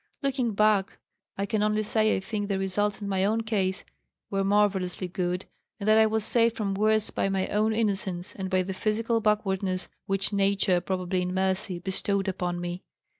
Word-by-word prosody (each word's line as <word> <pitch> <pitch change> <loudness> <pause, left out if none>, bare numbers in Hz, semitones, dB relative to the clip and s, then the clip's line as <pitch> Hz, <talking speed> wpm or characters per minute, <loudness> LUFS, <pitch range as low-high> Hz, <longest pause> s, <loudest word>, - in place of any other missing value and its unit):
"Looking 255 -5 0
back, 210 -2 +2 0.4
I 200 - 0
can 215 0 -1
only 210 0 +1
say 215 +1 +2
I - - -1
think, 205 +1 -3
the 195 - +1
results 200 +2 -1
in - - -3
my 190 -1 0
own 220 +3 +2
case 195 -4 -1 0.5
were 195 0 +1
marvellously 195 -2 +1
good, 180 +1 -2 0.3
and 200 - -4
that 215 +1 +6
I 220 - +6
was 220 0 0
saved 230 -1 +2
from 200 -3 -1
worse 215 +2 +2
by 195 - 0
my 190 -1 0
own 215 +1 +2
innocence 195 -5 -1
and 190 -1 -5
by 185 -1 +2
the 190 +1 -4
physical 225 +3 0
backwardness 195 -3 0 0.2
which 195 +1 0
nature, 195 -2 +2
probably 185 0 -1
in 180 0 -2
mercy, 190 0 0
bestowed 195 +2 -1
upon 180 -2 -2
me. 175 +1 -4
195 Hz, 185 wpm, -27 LUFS, 185-215 Hz, 0.5 s, that